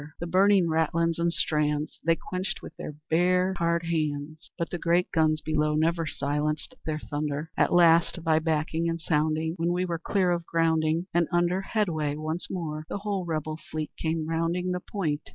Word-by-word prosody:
The 170 - -3
burning 190 +2 +4
ratlins 165 +1 +1
and 170 0 +2
strands 150 -2 0
They 165 +1 +3
quenched 185 +3 -4
with - - -9
their 150 - -7 0.2
bare 180 +3 +3
hard 170 0 +1
hands. 155 -1 -3
But 170 -1 -3
the 175 - -3
great 175 +2 +2
guns 155 -1 +2
below 150 0 +1
Never 165 +1 +1
silenced 150 - -2
their 155 -1 -1
thunder. 150 +1 -4
"At - - +2
last, 170 -1 +4
by 160 -1 +3
backing 160 +1 0
and 165 0 -2
sounding, 155 0 0
When 170 +1 0
we 180 +1 0
were 170 -2 -3
clear 185 +1 +1
of 170 -1 0
grounding, 160 0 +1
And 170 -1 +3
under 175 +1 +2
headway 165 -9 -1
once 155 +3 -4
more, 155 -4 -4
The - - -2
whole 200 -2 -2
Rebel 155 -1 -3
fleet 155 -1 -4
came 160 -1 -2
rounding 165 +3 0
The 180 - -1
point. 165 -6 -3
165 Hz, 180 wpm, -27 LUFS, 155-175 Hz, 0.2 s, burning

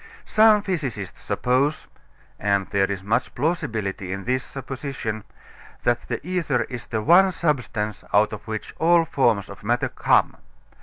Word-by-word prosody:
Some 215 -1 +5
physicists 135 - -4
suppose 135 +5 0 0.5
and 100 -1 +1
there 100 -2 +2
is 95 -1 -4
much 115 +5 -1
plausibility 110 - -2
in 95 0 -4
the 130 +3 +1
supposition 130 -5 -5 0.6
that - - 0
the - - -2
ether 165 -8 0
is 120 -3 -7
the 110 -2 -2
one 185 - +6
substance 125 - -2
out 105 +2 +3
of 105 - -8
which 110 -1 -5
all 170 +1 +4
forms 120 - +1
of 100 - -11
matter 120 +3 +1
come. - - +2
125 Hz, 145 wpm, -23 LUFS, 105-155 Hz, 0.6 s, one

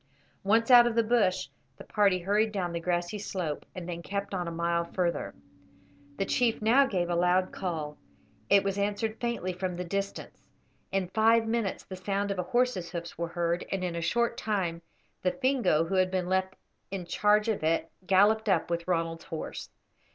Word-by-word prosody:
Once 225 +5 +3
out 240 -1 +9
of 235 - -1
the 230 - +4
bush, 200 -5 +1 0.3
the - - -10
party 200 -3 +2
hurried 205 +5 +1
down 185 -4 -2
the 170 - -3
grassy 175 +3 -1
slope, 180 -7 -4
and 180 -2 -6
then 170 -1 -5
kept 200 +2 -4
on 180 -2 -2
a - - -3
mile 170 0 0
further. 170 0 -2 0.8
The 195 - 0
chief 235 +2 +1
now 245 +6 +4
gave 180 -7 -1
a 175 - -1
loud 180 +2 +2
call. 155 -5 -4 0.5
It 200 -1 +6
was 200 0 -1
answered 210 +2 -1
faintly 235 -6 -2
from 180 0 -3
the 180 - -4
distance; 200 +3 -4 0.5
in 195 -2 -1
five 225 +2 +4
minutes 225 -3 -1
the 190 - -7
sound 200 +2 -2
of 195 - -3
a 180 - -3
horse's 240 -8 +1
hoofs 170 -1 -6
were 170 +1 -3
heard, 170 0 -1
and 195 -1 -1
in 175 -2 -2
a 170 - -2
short 235 +7 0
time 180 -6 -1 0.4
the 180 - +1
Fingo 250 - +2
who 195 - -4
had 185 -1 +3
been 185 -1 -1
left 190 0 0 0.3
in 190 -2 -5
charge 210 +4 +2
of 215 -7 -1
it, 165 +1 0 0.2
galloped 210 +3 +4
up 175 -2 +1
with 170 0 -2
Ronald's 165 -2 -1
horse. 160 - -6
190 Hz, 190 wpm, -29 LUFS, 175-210 Hz, 0.8 s, out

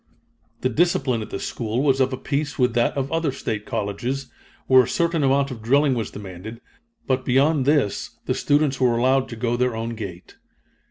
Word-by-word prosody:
The 130 - +1
discipline 135 -4 +1
at 110 - -7
this 100 - -4
school 115 +2 -2
was 135 -2 +3
of 130 0 +2
a 130 - -3
piece 145 +2 -2
with 125 -2 +2
that 120 +3 +1
of 135 0 -2
other 165 -3 0
State 110 -5 -4
colleges, 120 +5 -3 0.3
where 130 -1 +7
a 125 - -2
certain 170 -1 0
amount 140 0 +2
of 115 -3 -7
drilling 140 +5 +3
was 115 -3 -2
demanded, 100 +3 -9 0.5
but 130 -1 0
beyond 135 +2 +2
this 145 -9 +1
the - - 0
students 145 -2 +1
were 120 -2 +3
allowed 130 +2 +2
to 115 - -6
go 115 +1 -1
their 125 -1 0
own 115 +1 -3
gait. 100 -6 -8
130 Hz, 195 wpm, -23 LUFS, 115-140 Hz, 0.5 s, where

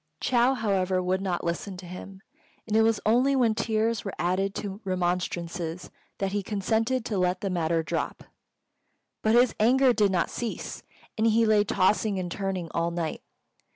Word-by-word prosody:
Chou, 250 +1 +3
however, 190 -5 0
would 185 +1 0
not 185 -3 -2
listen 175 +3 -3
to 180 - -10
him; 190 +2 -9 0.4
and 215 - -2
it 220 - +6
was 225 -1 +3
only 250 +6 +3
when 240 -4 +3
tears 220 0 0
were 195 - -5
added 190 +3 0
to 200 0 -5
remonstrances 175 -2 -2 0.3
that 195 -1 -1
he 205 0 -1
consented 220 +5 0
to 205 -4 -1
let 180 0 +1
the 195 - -2
matter 165 -2 0
drop. - - -3 1.0
But 220 +1 +3
his 245 0 +5
anger 255 +3 +5
did 205 -4 +2
not 175 -3 0
cease, 235 -2 -5 0.4
and 225 - +3
he 225 +1 +4
lay 215 -1 +4
tossing 200 +1 +1
and 180 -2 -3
turning 190 -3 -3
all 170 0 0
night. 170 -2 -3
195 Hz, 170 wpm, -27 LUFS, 180-220 Hz, 1.0 s, it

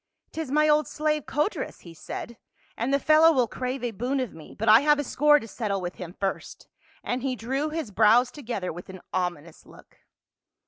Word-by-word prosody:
" - - -51
'Tis 320 -4 -5
my 300 +2 +3
old 300 0 +3
slave 305 -1 -1
Codrus," 300 +9 -2
he 170 - -12
said, 230 +7 -8 0.4
"the 265 +5 +1
fellow 310 +3 +5
will 255 -6 +2
crave 255 +3 -4
a 240 - -1
boon 245 +6 -2
of 255 -5 -3
me, 160 - -13
but 225 - -3
I 215 +1 +9
have 295 0 +4
a 290 - -1
score 295 +2 +4
to 225 - -9
settle 205 -3 -3
with 180 -1 -6
him 180 0 -8
first," 195 -1 -4 0.4
and 250 +1 -2
he 260 -1 -1
drew 265 +6 -2
his 310 -8 -4
brows 225 +5 +4
together 235 - -5
with 175 +3 -10
an 190 -1 -10
ominous 175 -3 -3
look. - - -18
250 Hz, 200 wpm, -26 LUFS, 200-295 Hz, 0.4 s, I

